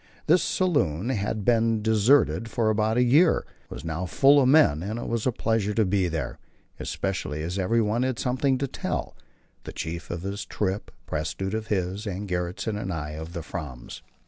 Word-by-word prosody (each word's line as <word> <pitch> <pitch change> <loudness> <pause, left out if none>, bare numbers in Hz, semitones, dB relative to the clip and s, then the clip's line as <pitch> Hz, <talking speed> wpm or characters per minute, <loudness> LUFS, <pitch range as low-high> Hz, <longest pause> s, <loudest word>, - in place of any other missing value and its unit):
This 175 +3 +5
saloon, 130 - +1
after 105 -2 -1
being 115 0 +2
deserted 110 +2 +3
for 110 -1 +1
a 110 +2 +1
year, 145 +8 +4 0.2
was - - -8
now 80 +3 -3
full 140 +8 +5
of 130 - +3
men, 135 - +5
and 105 +5 -3
it 120 - -5
was 115 +1 -1
a - - +3
pleasure 110 -3 0
to 110 - +3
be 95 -1 +1
there; 80 -4 -4 0.4
especially 80 -6 -3
as 90 +4 -3
everyone 110 +3 +1
had 130 -2 0
something 130 +1 +1
to 140 +1 -1
tell - - -4 0.5
the - - -7
Chief 85 0 -5
of 85 0 -4
his 100 +2 -4
trip, 100 0 -2 0.2
Prestrud 80 +6 -3
of 110 0 -3
his, 95 +2 -2
and 100 +1 -4
Gjertsen 95 +4 -2
and 95 - -3
I 75 -3 -4
of 80 +2 -7
the 85 -2 -5
Fram's. 70 -9 -7
105 Hz, 180 wpm, -26 LUFS, 90-115 Hz, 0.5 s, This